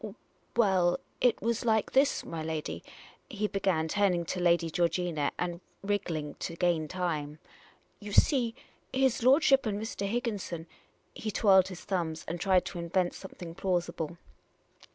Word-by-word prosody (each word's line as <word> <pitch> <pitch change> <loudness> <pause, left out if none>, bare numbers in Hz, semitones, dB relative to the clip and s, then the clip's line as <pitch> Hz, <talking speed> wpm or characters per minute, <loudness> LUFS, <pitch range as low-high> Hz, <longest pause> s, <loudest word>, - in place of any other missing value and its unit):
" - - -39
Well, 190 -6 +3 0.2
it 245 -2 +4
was 235 0 0
like 220 -2 +2
this, 275 +2 +3
my 165 -1 -5
lady," 160 -1 -4 0.5
he 210 -4 -2
began, 190 -6 0
turning 180 -1 +1
to 180 - -3
Lady 170 -2 +3
Georgina, 170 -3 0
and 175 0 -3 0.2
wrig 205 0 0
gling 155 -3 -4
to 165 - -4
gain 170 -3 +1
time. 155 -4 -3 0.3
" 180 - -34
You 205 0 -7
see, 240 0 +3 0.4
his 265 -2 +2
lordship 270 0 +5
and 205 -1 -1
Mr. 205 -2 -3
Higgin 235 -3 -1
son 170 -3 -6 0.3
" - - -40
he 220 - -4
twirled 190 -3 +5
his 185 -2 -8
thumbs 170 -5 -2
and 170 +1 -3
tried 185 -1 +3
to 175 - -5
invent 175 +1 0
something 175 -3 -9
plausible. 175 -3 -2
180 Hz, 160 wpm, -30 LUFS, 170-210 Hz, 0.5 s, lordship